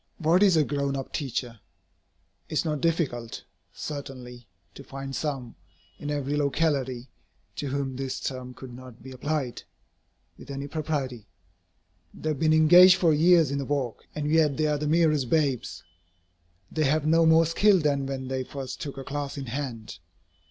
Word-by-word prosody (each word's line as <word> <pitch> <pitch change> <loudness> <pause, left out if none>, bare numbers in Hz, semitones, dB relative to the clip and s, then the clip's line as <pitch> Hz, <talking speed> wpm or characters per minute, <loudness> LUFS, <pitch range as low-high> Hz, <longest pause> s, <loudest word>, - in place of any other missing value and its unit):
What 170 +3 +3
is 190 -5 +5
a 155 - +5
"grown 140 -1 -2
up" 135 - -7
teacher? 125 -4 -3 0.9
It - - -7
is 155 - +1
not 150 -3 -2
difficult, 145 -9 -1 0.3
certainly, 130 -5 -8 0.3
to 140 - -11
find 135 0 -7
some, 135 -6 -3 0.5
in 145 - -5
every 145 -1 -1
locality, 140 -4 -1 0.5
to 145 - -3
whom 135 -1 -2
this 135 0 -4
term 125 -1 -5
could 130 -2 -10
not 125 -1 -12
be 130 - -9
applied, 135 -1 -3 0.8
with - - -13
any 140 0 -5
propriety. 140 -8 -3 0.9
They 155 - -4
have 150 -3 -2
been 155 -1 +3
engaged 175 +4 +8
for 165 -4 +3
years 165 -1 +5
in 140 - -1
the 140 - -3
work, 135 -4 -3
and 150 -1 -2
yet 155 -3 +3
they 155 - +1
are 150 -1 +1
the 150 - -2
merest 155 -5 +2
babes. 140 - 0 0.9
They 155 -1 0
have 150 +2 +1
no 165 +1 +4
more 160 +1 +6
skill 195 +5 +4
than 145 -4 0
when 135 -1 -4
they 130 0 -2
first 130 0 -7
took 140 -4 -6
a 135 - -5
class 145 +1 -4
in 135 - -5
hand. 120 -7 -5
140 Hz, 170 wpm, -26 LUFS, 130-155 Hz, 0.9 s, engaged